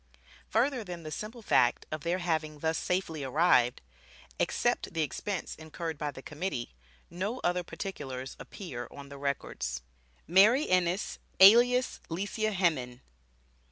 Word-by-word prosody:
Further 250 +1 +1
than 175 -3 -7
the 155 - -7
simple 220 +6 -6
fact 120 - +3
of 155 -1 -3
their 170 +4 0
having 160 -4 -1
thus 160 +2 0
safely 170 -5 -1
arrived, 135 -3 +3 0.6
except - - 0
the 160 - +2
expense 190 +5 -3
incurred 160 0 -6
by 150 - -1
the 135 -2 -9
Committee, 150 - -4 0.4
no 200 +8 -3
other 180 +1 +1
particulars 135 -8 -6
appear 125 - -7
on 140 -1 -11
the 140 0 -9
records. 130 - -3 0.4
MARY 215 - +5
ENNIS 185 +1 +1 0.2
ALIAS 240 +6 +7
LICIA 205 +5 -1
HEMMIN. 135 -10 0
170 Hz, 130 wpm, -30 LUFS, 145-195 Hz, 0.6 s, ALIAS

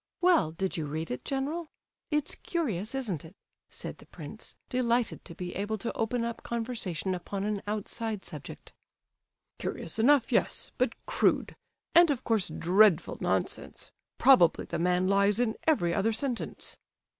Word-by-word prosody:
Well, 350 - +4
did 180 +4 -3
you 155 -2 -2
read 155 +2 -4
it, 125 - -4
general? 290 +5 -2 0.4
It's 300 -1 0
curious, 240 - -2
isn't 210 - -2
it?" 165 +4 -13 0.3
said - - -6
the - - -15
prince, - - -10
delighted 245 -2 0
to 170 - -10
be 180 -1 -5
able 205 +3 -2
to 220 +3 -4
open 230 +1 0
up 235 0 -4
conversation 225 -6 -3
upon 195 +2 -4
an 210 -1 -1
outside 215 0 -3
subject. - - -9 0.9
"Curious - - -3
enough, 265 +2 +4
yes, - - +1
but - - +1
crude, - - +1 0.4
and 345 0 +7
of 270 -4 0
course 220 -5 +2
dreadful 185 0 +3
nonsense; - - -2 0.3
probably 210 -12 +5
the 170 - -3
man 180 +1 +2
lies 200 +2 +3
in 235 -3 +1
every 175 - +3
other 220 +5 +1
sentence." 245 +1 -4
215 Hz, 150 wpm, -29 LUFS, 180-250 Hz, 0.9 s, and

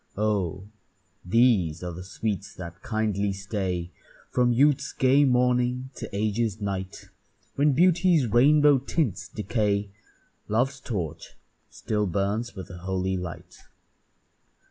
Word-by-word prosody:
Oh! 100 -4 -1 0.6
these 90 -6 +2
are 90 - -4
the 90 +2 -8
sweets 100 +1 -4
that 85 -1 -9
kindly 105 -2 -1
stay 95 -3 -3 0.4
From 125 -1 +3
youth's 140 +3 +2
gay 135 +2 +4
morning 125 0 +1
to - - -7
age's 110 +1 -1
night; 95 -2 -5 0.4
When 145 +1 +3
beauty's 170 -1 +4
rainbow 145 +5 +5
tints 130 - -2
decay, 105 -2 -1 0.6
Love's 130 +6 0
torch 90 - -5 0.3
still 105 -1 -2
burns 100 +6 -2
with 95 -2 -8
a 90 - -9
holy 95 +1 -2
light. 90 -2 -7
105 Hz, 115 wpm, -26 LUFS, 95-125 Hz, 0.6 s, rainbow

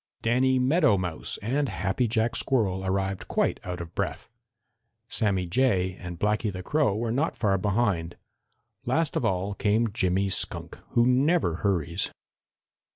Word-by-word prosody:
Danny 130 +3 +3
Meadow 135 - +3
Mouse 85 -3 -3
and 135 +5 0
Happy 95 +6 0
Jack 115 +1 0
Squirrel 100 -8 +1
arrived 95 0 -2
quite - - 0
out 90 -1 -5
of 85 0 -8
breath. - - -3 0.8
Sammy 100 -6 0
Jay 95 -2 +1
and 90 -2 -7
Blacky 105 +1 +1
the 95 0 -7
Crow 145 -4 +1
were 115 +1 -2
not 140 +7 0
far 100 -4 +1
behind. 100 -5 0 0.7
Last 155 +5 +1
of - - 0
all 95 -2 0
came 105 +2 +1
Jimmy 95 -1 +1
Skunk, - - -1
who 120 - +4
never 130 - +2
hurries. 90 -3 -1
105 Hz, 145 wpm, -27 LUFS, 95-125 Hz, 0.8 s, who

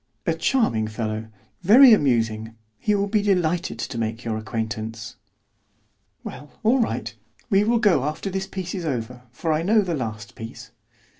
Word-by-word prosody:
"A - - +2
charming 115 - +1
fellow, 110 0 -4 0.3
very 235 +7 +8
amusing. 115 - +1 0.2
He 210 - +1
will 200 0 +1
be 210 +1 +1
delighted 180 -3 0
to 115 - -4
make 115 +1 -3
your 115 -1 -1
acquaintance." 110 0 -4 1.1
"Well, 145 +3 -8
all 240 +5 +4
right; 225 - -2 0.4
we 195 +1 +5
will 235 +2 +2
go 205 - +3
after 155 +6 -3
this 190 0 -3
piece 185 -2 -5
is 185 -3 -4
over, 125 -4 -3
for 155 +6 -1
I 155 - +1
know 210 +5 +4
the 180 -4 -2
last 110 -5 -5
piece." 115 0 -9
150 Hz, 160 wpm, -23 LUFS, -, 1.1 s, very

